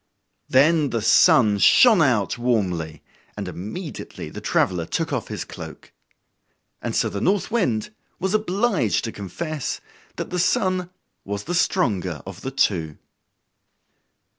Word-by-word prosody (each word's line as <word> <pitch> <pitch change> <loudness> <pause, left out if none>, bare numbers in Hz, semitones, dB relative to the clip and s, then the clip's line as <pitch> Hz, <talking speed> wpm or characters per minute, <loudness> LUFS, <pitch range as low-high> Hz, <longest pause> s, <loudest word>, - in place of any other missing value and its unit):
Then 150 +2 +4
the 115 -3 -2
Sun 105 -2 +5
shined 220 - +6
out 120 -9 +2
warmly, 90 -11 -1 0.3
and - - -4
immediately 140 - -7
the - - -8
traveler 85 -3 0
took 160 -3 -2
off 125 -6 -2
his - - -5
cloak. - - -10 0.9
And - - -3
so - - +2
the 100 - -4
North 200 - +1
Wind 130 - 0 0.3
was 190 +2 -1
obliged 205 - +1
to 115 - -3
confess 145 - -4 0.4
that - - -5
the 180 - -1
Sun 185 -2 +1 0.3
was 100 +1 -4
the 175 - -4
stronger 100 - 0
of 95 +1 -9
the 130 - -4
two. 90 - 0
130 Hz, 135 wpm, -23 LUFS, -, 0.9 s, shined